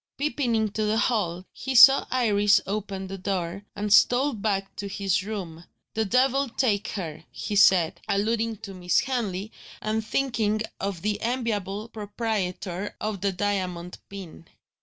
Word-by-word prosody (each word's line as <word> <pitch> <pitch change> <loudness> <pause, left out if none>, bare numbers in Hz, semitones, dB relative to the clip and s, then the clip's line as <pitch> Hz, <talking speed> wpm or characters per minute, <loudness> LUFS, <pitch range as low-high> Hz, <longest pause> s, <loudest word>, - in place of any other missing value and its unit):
Peeping 280 -4 0
into 220 -1 0
the 215 +1 +1
hall, 185 -7 0
he 265 -1 -4
saw 270 +3 +9
Iris 210 -5 +3
opening 195 -1 -4
the 195 +1 -7
door, 185 0 -3
and 205 0 0
stole 255 +7 +5
back 200 -2 -2
to 200 - -4
his 195 -1 0
room. 185 -6 -6 0.3
"The 220 0 0
devil 260 +4 +2
take 220 -4 0
her!" 160 -6 -5
he 210 - -4
said, 185 -5 +4
alluding 225 +2 0
to 195 - -7
Miss 180 -1 +1
Henley, 220 -6 -3 0.3
and 220 +1 -1
thinking 220 -3 0 0.2
of 195 -3 -3
the 210 0 -1
enviable 220 -4 -2
proprietor 205 -4 -3
of 210 -3 -3
the 200 0 +1
diamond 180 -2 -3
pin. 185 -4 -10
205 Hz, 145 wpm, -26 LUFS, 190-225 Hz, 0.3 s, saw